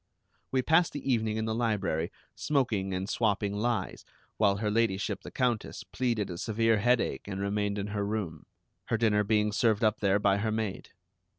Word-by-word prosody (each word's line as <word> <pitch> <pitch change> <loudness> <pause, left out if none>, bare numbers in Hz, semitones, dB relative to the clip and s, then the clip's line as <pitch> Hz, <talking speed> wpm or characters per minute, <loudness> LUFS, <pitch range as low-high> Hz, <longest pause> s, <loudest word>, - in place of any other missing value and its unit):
We 130 -1 +1
passed 160 +5 +3
the 145 -2 -2
evening 110 -2 0
in 110 - -1
the 110 - -1
library 105 -8 -1 0.2
smoking 115 -10 0
and 95 +1 -2
swapping 105 -2 0
lies, 115 +3 -2 0.3
while 100 -2 +3
Her 105 0 -1
Ladyship 110 -3 0
the - - -9
Countess 120 -4 -1
pleaded 115 -6 -1
a 85 - -6
severe 115 0 +2
headache 120 0 +1
and 95 -1 -4
remained 100 +1 -1
in 100 - -2
her 105 0 -2
room, 100 -7 -4 0.4
her 115 - 0
dinner 105 -2 +3
being 105 0 +2
served 110 0 +2
up 110 -1 +2
there 100 -1 +3
by 100 -1 +2
her 110 +2 -1
maid. 110 -3 -3
105 Hz, 180 wpm, -29 LUFS, 100-115 Hz, 0.4 s, passed